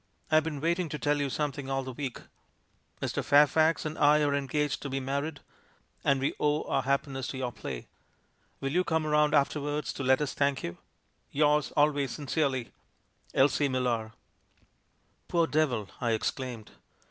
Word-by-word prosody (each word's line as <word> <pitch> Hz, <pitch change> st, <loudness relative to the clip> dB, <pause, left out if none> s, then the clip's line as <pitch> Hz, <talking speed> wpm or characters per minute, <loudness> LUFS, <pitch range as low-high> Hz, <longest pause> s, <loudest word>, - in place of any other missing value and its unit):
I've 155 Hz, 0 st, +5 dB
been 150 Hz, -3 st, -4 dB
waiting 170 Hz, +1 st, 0 dB
to 150 Hz, -, -4 dB
tell 145 Hz, 0 st, +1 dB
you 140 Hz, -, 0 dB
something 140 Hz, -1 st, -3 dB
all 135 Hz, 0 st, -1 dB
the 130 Hz, -, -6 dB
week. 130 Hz, -1 st, -5 dB, 0.8 s
Mr. -, -, -1 dB
Fairfax 150 Hz, +3 st, +4 dB
and 155 Hz, 0 st, -4 dB
I 150 Hz, +1 st, +5 dB
are 145 Hz, -1 st, +2 dB
engaged 140 Hz, 0 st, -1 dB
to 140 Hz, -, -4 dB
be 135 Hz, 0 st, -2 dB
married 140 Hz, +3 st, -3 dB, 0.3 s
— -, -, -38 dB
and 140 Hz, -1 st, +3 dB
we 135 Hz, -, 0 dB
owe 150 Hz, +1 st, +1 dB
our -, -, 0 dB
happi 140 Hz, +2 st, 0 dB
ness 135 Hz, -1 st, -4 dB
to 135 Hz, -, -5 dB
your 130 Hz, -2 st, -2 dB
play. 65 Hz, -, -6 dB, 0.8 s
Will 135 Hz, -, -1 dB
you 180 Hz, +4 st, +2 dB
come 160 Hz, -2 st, 0 dB
round 150 Hz, 0 st, +3 dB
after 145 Hz, +1 st, +2 dB
wards 145 Hz, +1 st, -2 dB
to 140 Hz, -, -5 dB
let 130 Hz, 0 st, +4 dB
us 150 Hz, -3 st, -2 dB
thank 140 Hz, -1 st, 0 dB
you? 85 Hz, -, -5 dB, 0.3 s
— -, -, -43 dB
Yours 150 Hz, +1 st, +2 dB
always 145 Hz, -3 st, +2 dB
sin 145 Hz, -, -7 dB
cerely, 135 Hz, -5 st, 0 dB, 0.6 s
"Elsie 145 Hz, +1 st, +3 dB
Millar." 120 Hz, -4 st, -1 dB, 1.1 s
"Poor 170 Hz, -1 st, +2 dB
devil!" 140 Hz, -10 st, 0 dB
I 120 Hz, -2 st, +1 dB
exclaimed. 115 Hz, 0 st, -3 dB
140 Hz, 180 wpm, -29 LUFS, 130-150 Hz, 1.1 s, I've